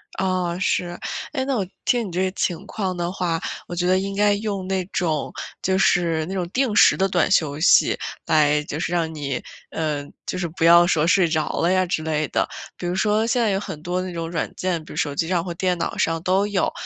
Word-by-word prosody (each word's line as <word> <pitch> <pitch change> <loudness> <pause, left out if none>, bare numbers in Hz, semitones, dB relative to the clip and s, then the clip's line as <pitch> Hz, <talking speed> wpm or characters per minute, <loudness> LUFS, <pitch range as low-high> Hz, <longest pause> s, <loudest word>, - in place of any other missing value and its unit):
啊， 185 -2 -1
是。 175 -1 0 0.4
诶， 260 -3 0
那 270 -1 0
我 195 -4 -1 0.2
听 240 -3 +1
你 180 - -8
这 180 +2 0
个 185 - 0
情 185 0 -2
况 190 -4 -3
的 175 0 -2
话， 175 -3 -1 0.3
我 175 - -5
觉 175 +1 -1
得 185 +1 +3
应 195 +1 -4
该 205 0 +3
用 200 -2 -3
那 190 -1 0
种 165 -5 -1 0.3
就 190 0 +1
是 170 -4 +2
那 190 - -6
种 180 -2 -2
定 250 -1 0
时 - - +7
的 195 - +2
短 180 -3 +1
休 155 -5 +2
息 170 - +5 0.3
来 150 -2 +3
就 150 0 -5
是 170 - -2
让 165 -2 0
你 140 -4 -4 0.3
呃， 150 -3 -2 0.2
就 185 - -3
是 175 - -1
不 165 0 -5
要 170 +1 +7
说 160 -3 +2
睡 180 0 +4
着 155 -1 0
了 170 +2 +2
呀 185 0 +3
之 170 -3 -1
类 155 -2 -1
的。 - - 0 0.3
比 - - -6
如 180 - -1
说 215 +3 +2
现 240 +1 +1
在 225 - +2
有 195 - 0
很 155 -7 -7
多 180 +1 -1
那 185 0 -5
种 165 0 -4
软 165 - -2
件， 175 -4 -2
比 - - -10
如 - - -9
手 150 -4 0
机 165 +3 -1
上 175 -2 0
或 175 - -5
电 180 +1 0
脑 165 - -3
上 165 0 0
都 190 +2 +2
有。 200 -3 0
180 Hz, 255 characters per minute, -22 LUFS, 165-190 Hz, 0.4 s, 时